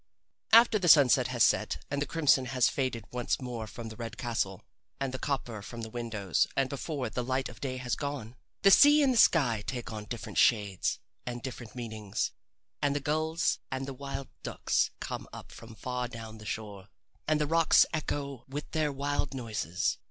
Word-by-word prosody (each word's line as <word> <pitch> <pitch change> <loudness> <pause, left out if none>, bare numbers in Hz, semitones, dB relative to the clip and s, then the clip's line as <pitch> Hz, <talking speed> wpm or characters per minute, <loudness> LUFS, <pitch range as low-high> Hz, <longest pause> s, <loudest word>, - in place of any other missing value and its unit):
After 230 -1 +7
the 180 - 0
sun 145 -5 +8
has 105 - +3
set - - +1
and 140 0 -1
the 145 - -1
crimson 145 -5 +3
has 125 -1 +2
faded 130 -5 -2
once 125 -1 -1
more 120 -4 -5
from 115 +1 -8
the 110 - -9
red 115 -1 -6
castle, 115 -6 -2 0.4
and 135 -2 -2
the 130 - -4
copper 125 -6 -3
from 115 +3 -8
the 110 - -6
windows, 110 -6 0
and 135 0 +1
before 140 -1 -3
the 125 - -2
light 130 +2 -1
of 120 - -13
day 130 -2 -3
has 125 -1 -2
gone, 140 -5 -5 0.3
the 195 - +7
sea 295 +6 +8
and 265 -2 +3
the - - 0
sky 120 - +4
take 120 -3 -4
on 105 -1 -6
different 120 +2 -4
shades 100 -5 +2 0.3
and 120 -1 -4
different 120 -4 -7
meanings, 110 -4 -3 0.5
and 140 0 +1
the - - +1
gulls 155 +3 0
and 130 0 -2
the 135 - -5
wild 140 0 -6
ducks - - 0
come - - -5
up - - -10
from 115 -1 -12
far 125 +1 -3
down 115 -2 -9
the 105 - -10
shore, 100 -3 -5 0.4
and 155 0 +2
the 150 - +2
rocks 165 +2 +5
echo 140 -4 -3
with 145 +3 -6
their 155 -2 +1
wild 140 0 -2
noises. 105 - -2
130 Hz, 190 wpm, -30 LUFS, 115-145 Hz, 0.5 s, sun